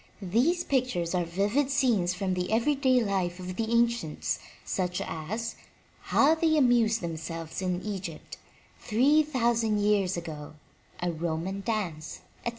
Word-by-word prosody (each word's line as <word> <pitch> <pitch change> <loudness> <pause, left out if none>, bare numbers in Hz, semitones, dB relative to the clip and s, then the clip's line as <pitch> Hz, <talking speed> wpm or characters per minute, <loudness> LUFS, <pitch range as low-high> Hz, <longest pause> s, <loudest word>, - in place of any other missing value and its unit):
These 255 - +2
pictures 245 -11 0
are 180 -1 +1
vivid 205 +11 0
scenes 235 -11 +2
from 185 0 -1
the 180 +1 -2
everyday 255 +1 +3
life 185 -3 -1
of 185 0 -6
the 225 - -1
an 235 +1 +4
cients, 230 -10 -3 0.3
such 180 -1 -1
as, 220 +9 -4 0.5
'*How 295 +3 +4
They 320 -1 +2
Amused 235 -4 +3
Themselves 165 0 -5
in 180 -1 -2
Egypt 190 -6 -6 0.4
Three 270 +8 +4
Thousand 235 -7 +1
Years 205 -3 +2
Ago,'* 155 -3 -7 0.5
A 175 - +1
Roman 170 +4 -3
Dance,*' 180 -9 -3 0.2
etc. - - -2
205 Hz, 140 wpm, -28 LUFS, 175-240 Hz, 0.5 s, an